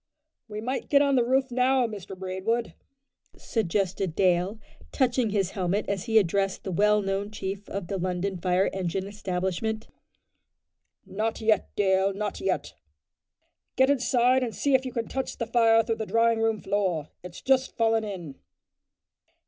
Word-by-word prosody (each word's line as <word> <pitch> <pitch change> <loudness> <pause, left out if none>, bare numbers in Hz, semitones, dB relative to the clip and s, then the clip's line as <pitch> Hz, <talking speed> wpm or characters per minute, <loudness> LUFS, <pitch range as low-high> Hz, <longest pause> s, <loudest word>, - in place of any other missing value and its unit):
"We 210 -1 -6
might 255 +4 -3
get 285 0 +5
on 280 -1 +2
the 245 - +4
roof 260 +2 +1
now, 255 +1 +3
Mr 200 -4 -7
Braidwood," 190 +5 -2 0.6
suggested 195 -4 -1
Dale, 185 +2 +2 0.3
touching 245 -3 +1
his 195 -3 0
helmet 190 +2 -1
as 200 0 -2
he 225 -2 +3
addressed 195 0 +1
the 190 - -4
well 210 +3 +3
known 195 +1 -2
chief 200 -1 -6
of 200 -2 -4
the 195 +2 -3
London 185 +2 -2
Fire 180 +2 +1
Engine 190 0 -2
Establishment. 200 +2 -3 1.2
"Not 215 +4 -2
yet, 220 -2 +2
Dale, 190 -1 +2
not 210 0 -3
yet," 385 - 0
said - - -11
Braidwood; - - -48
"get 265 +1 +4
inside 255 -1 +3
and 240 -3 -3
see 280 - 0
if 260 0 +3
you - - -5
can 235 -2 -3
touch 265 0 -4
the 230 - -2
fire 225 -1 +4
through 225 0 -2
the 220 - -4
drawing 230 0 +2
room 225 -1 +1
floor. 185 -7 -1
It's 180 -1 -10
just 265 0 +1
fallen 225 -1 +2
in." 180 -9 -7
210 Hz, 165 wpm, -27 LUFS, 190-230 Hz, 1.2 s, get